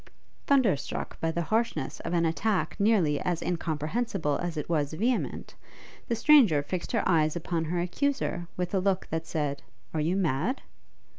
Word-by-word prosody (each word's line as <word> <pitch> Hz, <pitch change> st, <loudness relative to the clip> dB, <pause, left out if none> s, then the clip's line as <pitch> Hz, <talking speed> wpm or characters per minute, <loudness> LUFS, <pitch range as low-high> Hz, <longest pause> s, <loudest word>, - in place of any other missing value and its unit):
Thunderstruck 235 Hz, -, +1 dB
by 165 Hz, -, +1 dB
the 170 Hz, +1 st, -1 dB
harshness 225 Hz, +6 st, -1 dB
of -, -, -5 dB
an 170 Hz, -1 st, +2 dB
attack 190 Hz, +5 st, 0 dB
nearly 200 Hz, -9 st, +3 dB
as 175 Hz, -2 st, -1 dB
incomprehensible 165 Hz, +1 st, -1 dB
as 175 Hz, -2 st, -3 dB
it 150 Hz, -, -3 dB
was 150 Hz, -3 st, 0 dB
vehement, 235 Hz, +10 st, -1 dB, 0.5 s
the 235 Hz, -, 0 dB
stranger 225 Hz, -, +5 dB
fixed 175 Hz, +4 st, -4 dB
her -, -, +1 dB
eyes 155 Hz, -3 st, +3 dB
upon 170 Hz, -1 st, -2 dB
her 175 Hz, +3 st, -1 dB
accuser 180 Hz, -2 st, -1 dB
with 180 Hz, +1 st, -2 dB
a 195 Hz, -, +3 dB
look 190 Hz, 0 st, +1 dB
that 160 Hz, 0 st, -2 dB
said, 145 Hz, -3 st, -2 dB, 0.3 s
Are 155 Hz, -, 0 dB
you 165 Hz, +5 st, +1 dB
mad? 180 Hz, -, 0 dB
175 Hz, 160 wpm, -28 LUFS, 155-205 Hz, 0.5 s, stranger